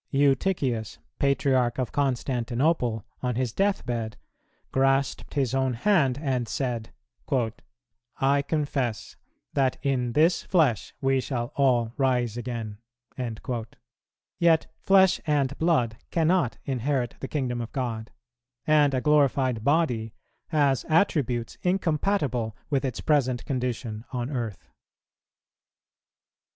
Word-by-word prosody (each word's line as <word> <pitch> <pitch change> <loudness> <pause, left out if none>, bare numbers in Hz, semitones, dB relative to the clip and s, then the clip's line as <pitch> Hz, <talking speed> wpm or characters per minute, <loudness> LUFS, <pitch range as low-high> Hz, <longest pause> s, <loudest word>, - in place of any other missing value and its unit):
Eutychius, 135 - +1 0.2
Patriarch 130 -3 +2
of 130 -4 -2
Constantinople, 125 -2 0 0.2
on 125 -2 -1
his 125 -2 -1
death 200 0 +1
bed, 115 -3 -3 0.5
grasped 135 +2 +1
his 135 -3 +1
own 130 -2 +1
hand 140 - +2
and 130 -5 -1
said, 120 -4 -3 1.3
"I 140 +1 +3
confess 140 -6 -2 0.4
that 135 -2 +1
in 125 -3 0
this 160 +6 +3
flesh 150 - +1
we 135 -1 +2
shall 120 -1 -3
all 120 -5 +2
rise 125 -4 +1
again;" 115 -3 -5 1.6
yet 165 -2 +4
flesh 190 -1 +4
and 140 -2 +1
blood 125 -9 +2
cannot 165 -5 +1
inherit 130 -1 -1
the 135 - -5
kingdom 125 -4 -2
of 115 - -6
God, 115 -4 -3 0.6
and 150 -3 +4
a 130 - 0
glorified 135 -5 +2
body 125 -7 +1 0.3
has 145 -5 +2
attributes 140 - +1
incompatible 155 - 0
with 140 -2 +1
its 130 -3 -3
present 130 -5 +1
condition 120 -4 -3
on 125 +1 -3
earth. 115 -7 -4
130 Hz, 110 wpm, -26 LUFS, 120-145 Hz, 1.6 s, yet